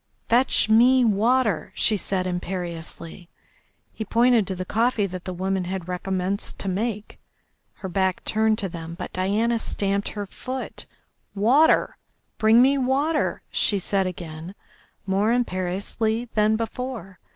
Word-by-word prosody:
"Fetch 245 0 +3
me 245 +3 +5
water!" 220 -1 +1
she 220 - +3
said 190 -1 -2
imperiously. 175 -1 -5 0.6
He 220 - -4
pointed 230 -1 +3
to 190 - -2
the 185 0 -5
coffee 225 +1 +1
that 185 -2 -7
the 185 - -3
woman 190 +1 -1
had 180 -1 -4
recommenced 185 +2 -3
to - - -5
make, 210 +2 -3 0.5
her 190 - -7
back 190 0 0
turned 220 0 +2
to 195 - -2
them, 170 -1 -7
but - - -7
Diana 215 +5 +1
stamped 200 -2 -1
her 205 -1 -5
foot. 255 +6 -7 0.5
"Water! 255 +11 +3 0.4
Bring 225 +2 +6
me 275 +1 +3
water!" 280 +5 0
she 205 - +3
said 195 0 0
again, 170 0 -7 0.5
more 200 +3 +1
imperiously 220 +1 -1
than 215 0 +3
before. 230 -4 -5
200 Hz, 135 wpm, -24 LUFS, 185-230 Hz, 0.6 s, Bring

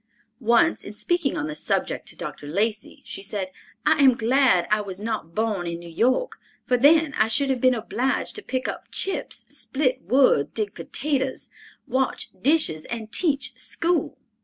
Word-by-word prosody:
Once, 235 0 +3
in 205 - -8
speaking 320 +5 0
on 295 - -1
the 305 - -4
subject - - -2
to - - -4
Dr. 145 - -7
Lacey, 210 +7 -1
she - - -6
said, 195 -1 -3 0.3
"I - - +4
am 260 -3 +7
glad 235 -6 +3
I 215 0 +3
was 195 -2 -7
not 210 -6 -4
born 215 -5 -1
in 170 0 -3
New 170 0 -10
York, 255 - +1 0.3
for 250 - +2
then 300 +4 +5
I 215 - +4
should 270 +5 +2
have 255 -2 -1
been 255 -1 +4
obliged 240 +3 -1
to - - -6
pick 260 -8 -3
up - - -5
chips, 390 - -1
split 265 -2 -1
wood, 240 - +3
dig 215 -2 -2
potatoes, 270 -2 -2 0.4
wash 265 0 -1
dishes 275 - +1
and 225 -2 -5
teach 285 0 +1
school!" 345 0 -1
240 Hz, 170 wpm, -24 LUFS, 210-275 Hz, 0.4 s, am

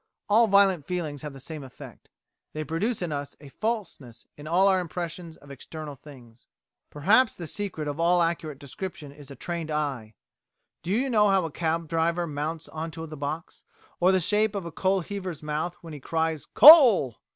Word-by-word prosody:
All 225 +3 +4
violent 195 -6 +3
feelings 160 -6 -4
have 150 -2 -7
the 135 - -11
same 150 +2 -8
effect. 130 -1 -13 0.4
They 155 - -4
produce 185 - -2
in 170 - -3
us 145 -1 -5
a 145 -1 -13
falseness 170 - -5
in 145 +1 -11
all 180 +4 +3
our 190 -1 +3
impressions 170 -1 -6
of 140 0 -15
external 150 +2 -8
things." 125 -5 -16 0.4
Perhaps 215 - +3
the 175 - -7
secret 165 -3 -4
of 145 +2 -4
all 175 +1 +3
accurate 165 -3 -3
description 145 +1 -8
is 145 -1 -14
a 140 - -9
trained 170 +2 -5
eye. 135 -8 -3 0.7
Do 175 - -8
you 240 +8 +1
know 210 -5 +3
how 190 -3 +2
a 165 - -5
cab 165 +1 -2
driver 165 +2 0
mounts 155 +1 -4
on 160 +1 -5
to 160 +1 -8
the 155 -1 -9
box, 150 +4 -6 0.4
or 180 +2 +4
the 190 - +3
shape 210 +4 +1
of 195 -3 -4
a 170 - -6
coal 190 +3 0
heaver's 180 -4 -6
mouth 155 +4 -3
when 165 -2 -10
he 150 - -8
cries 160 +1 -2
"Coal!"? 245 - +8
165 Hz, 190 wpm, -26 LUFS, 150-190 Hz, 0.7 s, Coal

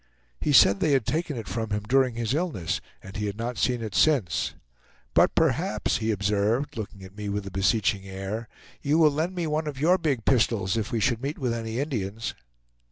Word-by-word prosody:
He - - 0
said 100 -7 +6
they 150 - +2
had 130 -5 +2
taken 155 0 -1
it 115 - -6
from 115 -1 -3
him 105 0 -2
during 130 -2 +3
his 115 +1 -1
illness, 150 - -1 0.2
and 95 +1 -11
he 105 0 -2
had 100 0 -4
not 115 0 -3
seen 125 0 +1
it 110 -3 -5
since; 105 - +2 0.6
"but - - +4
perhaps," 160 +4 +1
he 110 0 -2
observed, 105 +7 0
looking 105 -3 -7
at 95 +1 -12
me 105 -1 -5
with 100 0 -2
a 100 - -7
beseeching 95 0 +1
air, 95 +4 -5 0.3
"you 145 +2 +2
will 155 -2 +6
lend 160 +6 -2
me 175 -2 -1
one 155 0 -1
of 140 -3 -5
your 175 +6 +4
big 140 -9 -1
pistols 110 -6 +2
if 110 -2 -2
we 115 - 0
should 120 +1 +1
meet 140 +3 -3
with 125 -3 -1
any 115 0 -3
Indians." 115 -6 -3
115 Hz, 210 wpm, -26 LUFS, 105-145 Hz, 0.6 s, said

